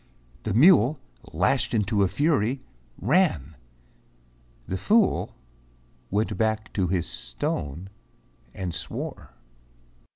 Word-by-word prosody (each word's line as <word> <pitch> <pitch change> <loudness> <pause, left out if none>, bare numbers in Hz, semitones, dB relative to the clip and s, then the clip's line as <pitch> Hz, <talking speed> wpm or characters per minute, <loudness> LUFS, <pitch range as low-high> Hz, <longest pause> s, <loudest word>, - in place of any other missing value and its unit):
The 105 - -2
mule, 140 - +6 0.3
lashed 95 - +1
into 105 -1 +1
a 100 - +4
fury, 130 - 0 0.4
ran; 100 - +1 1.1
The 95 - -3
fool 210 - +2 0.7
went 105 +2 0
back 110 0 -1
to 95 -3 0
his 85 -1 0
stone 70 +7 -4 0.6
and 90 -3 -5
swore. - - -7
105 Hz, 95 wpm, -25 LUFS, 90-130 Hz, 1.1 s, mule